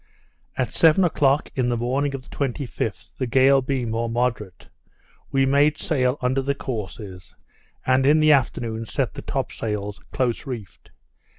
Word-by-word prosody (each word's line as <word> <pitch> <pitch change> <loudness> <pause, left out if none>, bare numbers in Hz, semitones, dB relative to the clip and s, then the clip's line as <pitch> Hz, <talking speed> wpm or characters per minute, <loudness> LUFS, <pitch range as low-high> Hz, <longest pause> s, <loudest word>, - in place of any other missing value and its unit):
At 125 -1 -1
seven 165 +3 +5
o'clock 145 -4 +2
in 125 -3 0
the 120 - 0
morning 135 +4 -1
of 130 - -7
the - - -13
25th, 125 -5 -3
the 130 - -1
gale 135 +3 +5
being 125 -3 -2
more 115 +1 -1
moderate, 115 -5 -2 0.6
we 135 0 +3
made 145 +3 +3
sail 130 -4 0
under 130 +2 +1
the 140 +1 -1
courses, 105 -7 -7 0.5
and 130 +1 +3
in 150 +3 +5
the 155 0 +5
afternoon 115 -5 0
set - - -1
the - - -7
top - - -3
sails 105 -2 -4
close 125 +1 -1
reefed. 115 -7 -8
130 Hz, 160 wpm, -23 LUFS, 115-140 Hz, 0.6 s, seven